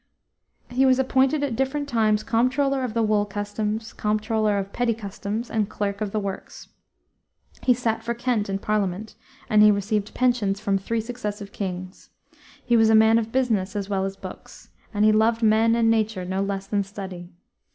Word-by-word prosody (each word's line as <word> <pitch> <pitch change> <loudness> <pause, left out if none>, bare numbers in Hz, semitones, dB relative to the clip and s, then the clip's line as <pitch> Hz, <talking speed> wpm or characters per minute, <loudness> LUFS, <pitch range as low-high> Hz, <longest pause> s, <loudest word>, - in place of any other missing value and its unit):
He 255 +2 +2
was 260 -1 +5
appointed 265 +2 +2
at 270 -5 -1
different 270 +3 -1
times 215 -4 +1
Comptroller 265 +3 +1
of 240 -3 -4
the 230 - +2
Wool 210 -1 +2
Customs, 210 +2 -4
Comptroller 215 0 0
of 195 0 -4
Petty 240 -2 0
Customs, 210 +2 -5
and 215 -3 0
Clerk 200 0 -3
of 210 -2 -2
the 215 - -1
Works. 200 -2 -7 0.9
He 250 - +3
sat 230 -2 -1
for 235 0 -2
Kent 235 -4 -1
in 195 - -1
Parliament, 210 0 -2 0.3
and 215 -3 +4
he 210 - +8
received 205 0 -1
pensions 235 -6 +1
from 200 -2 0
three 225 +4 -2
successive 210 -4 -6
kings. 185 -2 -6 0.6
He 240 -1 +3
was 225 -1 +5
a 220 - +5
man 220 +1 +6
of 225 0 -4
business 220 -7 0
as 200 -1 -3
well 190 -1 0
as 195 0 -3
books, - - -11 0.2
and 210 0 +2
he 215 - +6
loved 225 +2 +2
men 225 +1 +4
and 230 -1 +3
nature 215 -4 0
no 190 +2 -2
less 195 -1 -3
than 205 0 0
study. 190 -3 -8
215 Hz, 185 wpm, -24 LUFS, 200-230 Hz, 0.9 s, he